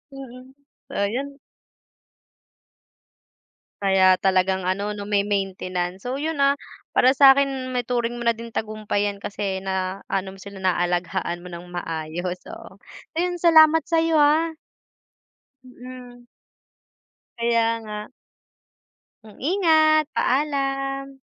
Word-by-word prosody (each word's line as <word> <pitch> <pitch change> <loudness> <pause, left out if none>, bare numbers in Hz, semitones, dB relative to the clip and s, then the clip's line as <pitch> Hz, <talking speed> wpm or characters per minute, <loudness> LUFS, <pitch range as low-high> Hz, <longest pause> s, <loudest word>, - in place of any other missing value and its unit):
Mm, 260 -1 -11 0.4
ayan. 260 +8 -2 2.4
Kaya 190 -1 +4
talagang 190 -1 +1
ano 200 +2 -1
'no, 205 -1 -7
may 200 -1 +2
maintenance. 185 -2 -3
So 255 +2 -3
yun, 320 0 -2
ah, 280 0 +3 0.3
para 260 +2 +4
sa 275 -1 +9
akin 270 -2 -1
maituring 240 -1 -1
mo 240 - -5
na 230 -1 +3
din 230 0 -9
tagumpay 215 -1 -2
yan 200 - -5
kasi 200 -2 -3
na 190 0 -3
ano 190 0 -2
mo - - -17
sila, 200 -1 -10
naalagaan 175 -1 -1
mo 180 - -10
ng 170 0 -8
maayos, 175 +1 -4
oo. - - -11 0.4
Ayun, 350 0 -1
salamat 320 -1 +6
sa 330 -1 +2
'yo 325 -1 +2
ah. 315 +3 +3 1.1
Mm. 250 -1 -12 1.1
Kaya 235 -1 +2 0.2
nga. 210 +2 -7 1.1
Hmm. 215 -1 -16
Ingat, 315 -2 +3
paalam. 275 -1 -1
230 Hz, 115 wpm, -23 LUFS, 190-275 Hz, 2.4 s, sa